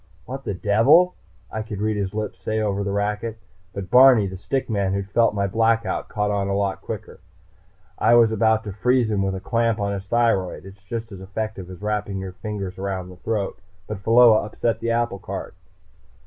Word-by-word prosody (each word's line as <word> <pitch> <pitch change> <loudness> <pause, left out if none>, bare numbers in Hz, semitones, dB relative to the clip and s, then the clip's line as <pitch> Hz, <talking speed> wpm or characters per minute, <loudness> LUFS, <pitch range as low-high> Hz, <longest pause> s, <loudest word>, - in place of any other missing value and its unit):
"What 135 +2 -7
the 100 - -2
devil!" 135 - +4 0.4
I 110 - -3
could 110 -2 -6
read 110 +1 0
his 100 -2 -2
lips 105 -3 -4
say 110 +3 -2
over 100 -2 -1
the 100 - -2
racket. 105 +2 -2 0.3
But 95 -1 -7
Barney, 125 -3 +7
the 95 -1 -5
stick 130 +8 -2
man 100 -4 0
who'd 100 0 -3
felt 115 0 +3
my 100 -1 +1
Blackout, 115 +3 0
caught 105 -1 -1
on 100 -1 0
a 100 - 0
lot 100 -1 -1
quicker. 105 -3 -7 0.8
I 115 +2 +5
was 115 -2 +6
about 110 0 +2
to 105 - -5
freeze 125 +2 +2
him 100 -2 +1
with 95 0 -1
a - - -4
clamp 115 +2 0
on 100 0 -1
his 100 0 -6
thyroid. 115 -6 +1
It's 95 0 -13
just 115 +3 -6
as 95 -1 -9
effective 100 -1 -5
as 95 +2 -10
wrapping 105 -2 -2
your 95 -1 -5
fingers 100 -2 -6
around 95 -2 -3
the 90 - -12
throat. 105 0 -3 0.3
But 105 +1 -6
Pheola 115 +1 +6
upset 110 +2 -2
the 115 - -2
apple 115 -4 0
cart. - - -6
105 Hz, 205 wpm, -23 LUFS, 100-115 Hz, 0.8 s, Barney